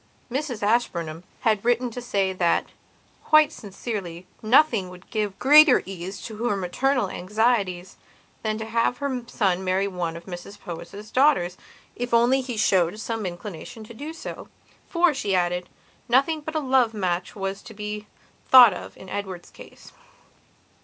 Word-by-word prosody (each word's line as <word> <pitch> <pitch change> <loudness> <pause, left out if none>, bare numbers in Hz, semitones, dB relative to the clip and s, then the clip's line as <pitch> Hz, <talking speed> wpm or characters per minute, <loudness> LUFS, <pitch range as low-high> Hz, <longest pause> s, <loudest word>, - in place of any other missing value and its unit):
Mrs 260 -5 -3
Ashburnham 175 -7 0 0.2
had 215 -4 +1
written 240 +1 +1
to 245 - -6
say 195 -5 0
that, 175 -2 +1 0.6
quite 310 -1 +5
sincerely, 195 -4 -6 0.2
nothing 225 -4 +3
would 180 0 -13
give 210 -3 -2
greater 295 0 +7
ease 190 0 -7
to 220 - -7
her 230 -2 0
maternal 250 +6 0
anxieties 195 -3 0 0.4
than 215 -1 -1
to 220 - -5
have 230 +2 0
her 270 -2 -2
son 190 -6 0
marry 190 +1 +1
one 175 -3 -3
of 170 - -12
Mrs 190 +3 -9
Powys' 190 +5 -9
daughters 255 -11 +3 0.4
if 245 -1 -1
only 245 +3 +4
he 250 -3 -5
showed 190 -1 +2
some 220 -2 -3
inclination 180 +4 -8
to 215 - -11
do 290 +7 -7
so. 325 - -8 0.4
For, 340 -2 +3
she 200 -7 -1
added, 180 0 0 0.4
nothing 280 +6 +3
but 315 +2 -7
a - - +2
love 255 -5 +2
match 180 -3 -2
was 195 -1 -4
to 225 -3 -12
be 210 0 -6 0.4
thought 245 -5 +9
of - - -9
in 190 - -12
her - - -5
Edward's 190 -3 -7
case. - - -14
210 Hz, 160 wpm, -24 LUFS, 185-245 Hz, 0.6 s, thought